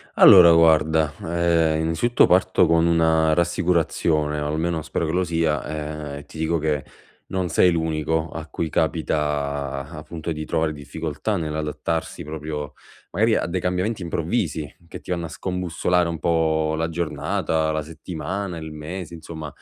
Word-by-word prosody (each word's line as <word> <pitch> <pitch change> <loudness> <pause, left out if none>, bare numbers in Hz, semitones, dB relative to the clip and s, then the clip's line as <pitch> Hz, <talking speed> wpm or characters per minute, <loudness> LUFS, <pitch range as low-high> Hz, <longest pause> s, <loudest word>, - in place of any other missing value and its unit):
Allora, 85 -3 +9
guarda, 80 -2 +4
ehm, 80 -2 +1
innanzitutto 120 +10 +3
parto 95 0 +4
con 85 0 +3 0.4
rassicurazione 85 -3 +1
o 75 - -2
almeno 80 +1 -1
spero 80 +2 -2
che 80 - -2
lo 90 +1 +2
sia, 80 -3 0 0.5
ehm, - - -5
e 70 - -13
ti 80 - -13
dico 80 +1 0
che 75 -2 -1 0.4
non 95 -2 -2
sei 90 +3 +4
l'unico 80 0 -1
a 80 -1 -7
cui 80 - -3
capita, 70 -4 -1
appunto, 80 0 -6
di 75 0 -5
trovare 80 0 -1
difficoltà 75 +3 -4
nell'adattarsi 80 0 -3
proprio, 75 -1 -5 0.4
magari 110 +5 +2
a - - -1
dei 90 +1 -2
cambiamenti 90 +4 -1
improvvisi 80 -3 -2 0.2
che - - -8
ti 90 - -4
anno 85 -1 -3
a - - -12
scombussolare 90 +2 -1
un 85 -1 -4
po' 80 -1 +1
la 80 +1 -1
giornata, 80 -1 -1
la 80 0 -1
settimana, 90 +3 -5
il 80 -1 -7
mese. 85 +3 -7
Insomma 80 -1 -8
80 Hz, 150 wpm, -23 LUFS, 75-85 Hz, 0.5 s, Allora